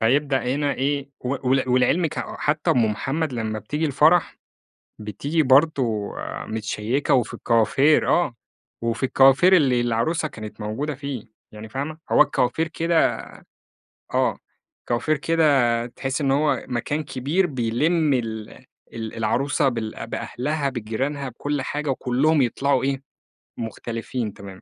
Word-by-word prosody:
فيبدأ 135 +3 +2
هنا 145 -1 0
إيه، 140 +1 -1
و 130 0 -3
ول 130 -1 +2
ولعلْمِك 130 +6 +2
حتّى - - -1
أم 120 - +3
محمد 145 +7 -2
لمّا 110 -2 -3
بتيجي 150 +9 -3
الفرح 155 +5 +3 0.6
بتيجي 140 - -1
برضو 130 -7 +3 0.3
متشيّكة 110 +5 -1
وفي 125 -4 +1
الكوافير 130 +6 +3
آه، 170 -9 +2 0.5
وفي 115 +2 -2
الكوافير 135 +8 +5
اللي 130 -7 +3
العروسة 120 +8 0
كانت 110 -4 -9
موجودة 135 +8 -3
فيه 140 -4 -5 0.3
يعني 110 +1 -10
فاهمة، 145 +6 -4
هو - - +6
الكوافير 125 +6 +2
كده 165 0 +1 1.0
آه، - - +1 0.5
كوافير 150 +6 +1
كده 140 -7 +2
تحسّي 135 +4 -3
إن 135 - +2
هو 140 -2 +1
مكان 145 +5 -2
كبير 145 +7 0
بيلم 145 +4 +1
ال 110 -3 -3 0.4
ال 110 -1 -6
العروسة 135 +6 +1
بال 115 -2 -5
بأهلها 140 +5 -2
بجيرانها 130 +4 -3
بكل 145 +4 -3
حاجة 150 +2 -3
وكلّهم 135 +4 +2
يطلعوا 135 +2 +1
إيه؟ 135 0 -1 0.6
مختلفين 115 0 -4
تمامًا، 100 -2 -11
135 Hz, 125 wpm, -23 LUFS, 115-145 Hz, 1.0 s, هو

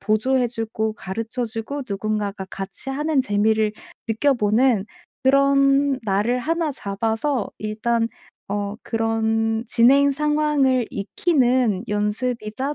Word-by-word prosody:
보조해 245 +5 +1
주고 220 -1 -3
가르쳐 225 +5 -4
주고 225 +6 -5
누군가가 200 -1 -3
같이 195 +7 -7
하는 295 +1 +1
재미를 215 -1 +1 0.3
느껴 230 +6 +2
보는 220 -1 +2 0.4
그런 275 0 +3
날을 210 +5 +1
하나 325 +2 -1
잡아서 225 +3 -2
일단 225 +2 -1 0.4
어 205 0 -2
그런 225 0 0
진행 275 +5 +5
상황을 295 -4 +1
익히는 245 - +1
연습이자 215 +5 -2
230 Hz, 240 characters per minute, -22 LUFS, 215-270 Hz, 0.4 s, 진행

